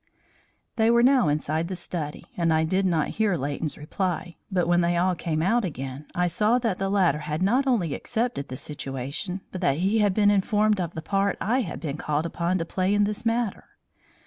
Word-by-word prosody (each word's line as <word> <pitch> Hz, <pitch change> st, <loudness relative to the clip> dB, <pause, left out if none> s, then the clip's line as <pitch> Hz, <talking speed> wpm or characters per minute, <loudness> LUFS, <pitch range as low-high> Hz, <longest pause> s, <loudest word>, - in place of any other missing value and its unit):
They 220 Hz, 0 st, +4 dB
were 235 Hz, 0 st, +5 dB
now 260 Hz, -, +5 dB
inside 155 Hz, +2 st, 0 dB
the 185 Hz, -, -4 dB
study 165 Hz, -4 st, -5 dB
and 170 Hz, -2 st, +1 dB
I 160 Hz, 0 st, +3 dB
did 185 Hz, +4 st, +1 dB
not 165 Hz, -4 st, +1 dB
hear 205 Hz, -5 st, +2 dB
Leighton's 145 Hz, +2 st, -3 dB
reply, 175 Hz, +2 st, -3 dB, 0.2 s
but 180 Hz, -3 st, +1 dB
when 175 Hz, 0 st, +3 dB
they 170 Hz, 0 st, +1 dB
all 180 Hz, +2 st, +2 dB
came 160 Hz, -2 st, -2 dB
out 230 Hz, +6 st, +2 dB
again, 135 Hz, -4 st, -5 dB
I 180 Hz, -, +2 dB
saw 210 Hz, +7 st, +2 dB
that 225 Hz, -7 st, -1 dB
the 195 Hz, 0 st, 0 dB
latter 185 Hz, -7 st, +2 dB
had 150 Hz, +3 st, -3 dB
not 250 Hz, +8 st, +2 dB
only 190 Hz, -, +1 dB
accepted 230 Hz, -, -2 dB
the 130 Hz, -, -6 dB
situation, 140 Hz, +7 st, -5 dB
but 185 Hz, -, -6 dB
that 160 Hz, -6 st, +2 dB
he 195 Hz, +6 st, +2 dB
had 205 Hz, -3 st, +2 dB
been 205 Hz, -1 st, +4 dB
informed 205 Hz, 0 st, +2 dB
of 170 Hz, -2 st, -4 dB
the 160 Hz, -, -5 dB
part 195 Hz, +2 st, 0 dB
I 240 Hz, +6 st, +1 dB
had 175 Hz, -10 st, -5 dB
been 150 Hz, -3 st, -4 dB
called 150 Hz, +1 st, -1 dB
upon 170 Hz, +2 st, -1 dB
to 165 Hz, -, -2 dB
play 185 Hz, +3 st, 0 dB
in 205 Hz, -, +4 dB
this 210 Hz, +2 st, -2 dB
matter. 230 Hz, -3 st, -1 dB
180 Hz, 210 wpm, -25 LUFS, 160-205 Hz, 0.2 s, were